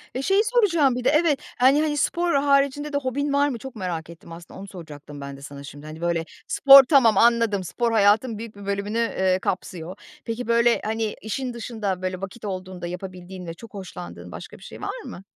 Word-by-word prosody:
Ve 260 - -1
şeyi 390 +8 +3
soracağım 375 - +3
bir 250 - -3
de - - +4
Evet, 300 -2 +3 0.2
hani 270 +4 +5
hani, 300 -1 0
spor 340 +3 +1
haricinde 280 +1 +2
de - - +2
hobin 285 +1 -2
var 285 +1 +3
mı? 250 - -4
Çok 265 +2 -9
merak 175 -5 -4
ettim, 170 0 -13
aslında 170 +2 -11
onu 200 - -8
soracaktım 150 -6 -10
ben 140 0 -7
de - - -14
sana 140 0 -9
şimdi. 145 +1 -11
Hani, 155 +1 -9
böyle, 170 -1 0 0.2
spor 275 0 +9
tamam, 245 -6 +4
anladım. 230 -4 +3
Spor 235 +6 -1
hayatın 220 +2 +3
büyük 225 -1 -8
bir 200 0 -11
bölümünü, 200 +2 -2
eee, 190 -5 +1
kapsıyor. 180 -1 -4 0.3
Peki, 230 +1 -4
böyle, 235 0 +3
hani, 220 0 -2
işin 245 +4 -4
dışında 220 -5 -4
böyle 185 0 -3
vakit 195 +4 -7
olduğunda 185 -2 -5
yapabildiğin 180 0 -8
ve 165 - -5
çok 225 +6 -14
hoşlandığın 90 - -9
başka - - -9
bir - - -17
şey - - -11
var - - -4
mı? 185 - -9
215 Hz, 205 wpm, -24 LUFS, 180-265 Hz, 0.3 s, spor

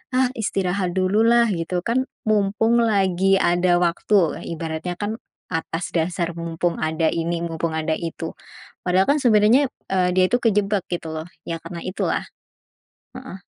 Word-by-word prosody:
"Ah, 260 0 +4
istirahat 190 -4 -1
dululah," 225 +5 +4
gitu, 175 +1 -2
"kan 260 +3 0 0.2
mumpung 215 +3 +2
lagi 195 -3 +2
ada 175 -1 +3
waktu." 175 0 +1
E 170 - -5
Ibaratnya 165 +2 -4
kan 215 +2 -3 0.3
atas 165 +1 -3
dasar 170 +1 -1
mumpung 170 +1 -2
ada 160 +1 +1
ini, 170 0 -2
mumpung 165 -1 -3
ada 160 0 0
itu. 165 0 -5 0.5
Padahal 185 +1 +3
kan 295 - +2
sebenarnya, 235 +4 +5 0.2
eee, 185 -1 +2
dia 185 - +6
itu 245 - +3
kejebak 205 -3 +1
gitu 170 -2 -4
loh, 155 +1 -5 0.2
ya 165 -1 -4
karena 170 0 -7
itulah. 185 - -1 0.9
Heeh. 190 -1 -9
180 Hz, 145 wpm, -22 LUFS, 170-210 Hz, 0.9 s, dia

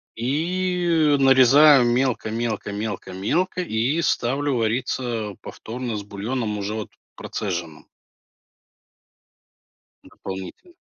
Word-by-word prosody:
И 165 +3 +1
нарезаю 135 +1 +6
мелко 120 -2 0
мелко 110 -2 -3
мелко 100 -2 -5
мелко 175 - -1
и 135 +1 0
ставлю 140 -1 0
вариться 115 -2 -2
повторно 120 0 -6
с 105 - -4
бульоном, 105 +2 -3
уже 100 +1 -3
вот 110 -1 -5 0.3
процеженным 85 -6 -5 2.2
дополнительно. 95 - -9
120 Hz, 90 wpm, -23 LUFS, 105-145 Hz, 2.2 s, нарезаю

